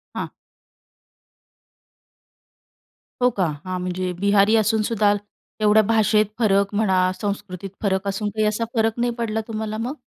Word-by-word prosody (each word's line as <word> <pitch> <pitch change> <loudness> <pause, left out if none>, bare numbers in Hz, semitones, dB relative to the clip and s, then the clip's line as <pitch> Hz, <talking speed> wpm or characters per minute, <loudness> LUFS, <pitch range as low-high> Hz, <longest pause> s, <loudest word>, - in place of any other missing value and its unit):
हां. - - -3 2.9
हो 250 - +5
का. 195 - -1 0.2
हां. 185 0 -3
म्हणजे 180 0 -2
बिहारी 200 +2 +4
असूनसुद्धा 215 -1 +2 0.5
एवढ्या 215 +1 +5
भाषेत 215 0 +3
फरक 200 -2 +2
म्हणा, 190 -3 +2
संस्कृतीत 200 -2 -4
फरक 190 -1 0
असून 205 +2 -2
काही 215 +1 -1
असा 215 +2 -1
फरक 225 -1 +2
नाही 240 0 +1
पडला 220 -1 -1
तुम्हाला 215 -1 -4
मग? 250 +6 -3
210 Hz, 125 wpm, -22 LUFS, 195-220 Hz, 2.9 s, हो